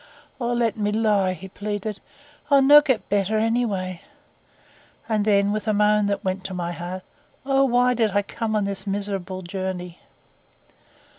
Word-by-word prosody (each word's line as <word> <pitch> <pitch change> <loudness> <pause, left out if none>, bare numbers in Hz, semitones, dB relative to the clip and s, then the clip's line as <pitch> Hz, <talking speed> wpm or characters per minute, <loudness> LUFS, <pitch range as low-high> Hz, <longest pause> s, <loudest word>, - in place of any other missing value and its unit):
'O 240 -1 -1
let 235 -3 0
me 210 -1 0
lie!' 210 -4 +2
he 185 +3 -10
pleaded. 205 +1 -5 0.5
'I'll 280 -2 +5
no' 295 +2 +9
get 265 -6 -1
better 205 +1 +1
anyway.' 215 -6 -1 1.1
And 215 -2 0
then, 200 -1 +3
with 215 0 -3
a 215 - +2
moan 210 0 +3
that 200 +1 -2
went 190 0 -2
to 190 - -5
my 175 -1 -3
heart, 175 +2 -6 0.4
'O 270 0 +3
why 250 0 +3
did 225 -3 +1
I 205 0 +1
come 220 +1 -3
upon 210 - +1
this 200 +1 -4
miserable 195 -2 -3
journey? 180 -1 -5
205 Hz, 160 wpm, -23 LUFS, 190-225 Hz, 1.1 s, no